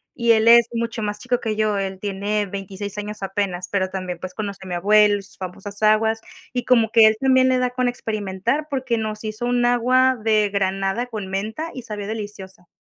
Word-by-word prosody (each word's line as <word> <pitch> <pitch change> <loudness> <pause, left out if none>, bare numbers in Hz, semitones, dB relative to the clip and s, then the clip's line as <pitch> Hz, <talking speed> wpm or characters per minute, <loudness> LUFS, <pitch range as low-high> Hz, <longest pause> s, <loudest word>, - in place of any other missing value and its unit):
y 235 -2 +2
él 220 0 +2
es 235 0 +7
mucho 230 -1 -3
más 210 0 -3
chico 250 +1 -1
que 215 -2 -2
yo, 215 -1 +1
él 190 -1 -3
tiene 205 +1 -1
26 200 +1 -6
años 210 0 -6
apenas, 190 -2 -2
pero 190 -2 0
también, 185 -2 -5
pues, 185 0 -6
conoció 200 -2 -6
a - - -8
mi 180 - -2
abuelo 205 +3 +4
y 195 - -10
sus - - -16
famosas 195 +3 -8
aguas, 220 +1 +3 0.3
y 245 - -1
como 230 -3 +3
que 225 -2 +8
él 220 0 +2
también 260 0 +4
le 255 - +3
da 250 0 0
con 250 0 0
experimentar 220 +4 -2
porque 260 -4 -1
nos 215 0 -4
hizo 215 +2 -4
un 245 0 +2
agua 255 +2 +3
de 215 -2 +3
granada 195 +3 -1
con 215 -5 -6
menta 215 +12 -4
y 255 - -7
sabía 210 -3 -6
deliciosa. 205 -4 -7
215 Hz, 210 wpm, -22 LUFS, 195-235 Hz, 0.3 s, que